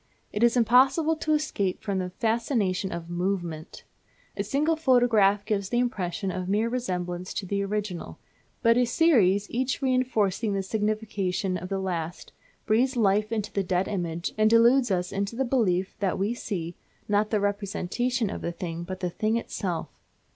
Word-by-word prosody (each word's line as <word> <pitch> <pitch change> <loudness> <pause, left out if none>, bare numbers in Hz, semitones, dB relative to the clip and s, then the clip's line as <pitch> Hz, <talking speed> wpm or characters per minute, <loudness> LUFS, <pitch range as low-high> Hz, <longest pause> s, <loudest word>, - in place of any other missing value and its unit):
It 210 - -2
is 235 +1 +4
impossible 265 +7 +4
to 310 0 0
escape 205 -12 -1
from 200 -3 -1
the 180 -1 -3
fascination 220 -3 0
of 170 -1 -5
movement. 175 -2 -3 0.5
A - - -1
single 305 +4 +1
photograph 235 -9 +3
gives 200 -3 -1
the 240 - 0
impression 195 -6 -1
of 185 0 -4
mere 215 +3 +1
resemblance 180 -7 -3
to 205 - -3
the 200 +2 -1
original; 200 -3 -4 0.5
but 230 0 +5
a 250 - +4
series, 225 - +3
each 255 +2 -1
reinforcing 235 -5 +1
the 195 - -1
signification 205 -3 -1
of 180 +1 -5
the 195 - -1
last, 175 -3 -4 0.3
breathes 255 +5 +2
life 210 0 +2
into 215 -2 -2
the 200 - +1
dead 185 0 0
image, 170 -4 -3
and 215 0 +5
deludes 240 +3 +5
us 180 -2 -1
into 200 +2 -2
the 265 +2 0
belief 195 -8 +1
that 195 -3 0
we 200 +4 0
see, 175 -8 -4 0.3
not 210 +1 +2
the 215 - +1
representation 205 +3 -1
of - - -6
a 170 - -1
thing, 170 -1 -5
but 185 +2 -6
the 180 - 0
thing 215 +5 0
itself. 185 -7 -4
205 Hz, 170 wpm, -26 LUFS, 185-235 Hz, 0.5 s, but